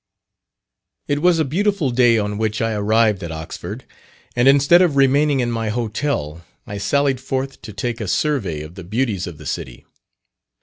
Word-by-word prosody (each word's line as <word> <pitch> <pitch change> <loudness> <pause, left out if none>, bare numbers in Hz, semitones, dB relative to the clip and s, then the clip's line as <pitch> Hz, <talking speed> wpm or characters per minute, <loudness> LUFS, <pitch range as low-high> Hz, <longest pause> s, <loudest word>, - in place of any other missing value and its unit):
It 145 0 0
was 180 0 +4
a 160 - +1
beautiful 185 -1 0
day 120 -1 +4
on 105 -1 -2
which 110 -1 -1
I 115 0 0
arrived 105 -1 +2
at 85 -2 -5
Oxford, 80 0 -7 0.5
and 120 +1 +3
instead 140 +6 +6
of 170 -6 +2
remaining 140 +1 +3
in 120 -1 -1
my 115 -1 -2
hotel, 105 - -2 0.2
I 100 0 -6
sallied 140 +3 +1
forth 135 +1 -3
to 110 - -9
take 115 +3 -4
a 105 - -3
survey 100 - 0
of 75 +2 -9
the 95 0 -9
beauties 105 -1 -1
of 85 -4 -8
the - - -12
city. 60 -2 -5
120 Hz, 175 wpm, -20 LUFS, 100-140 Hz, 0.5 s, instead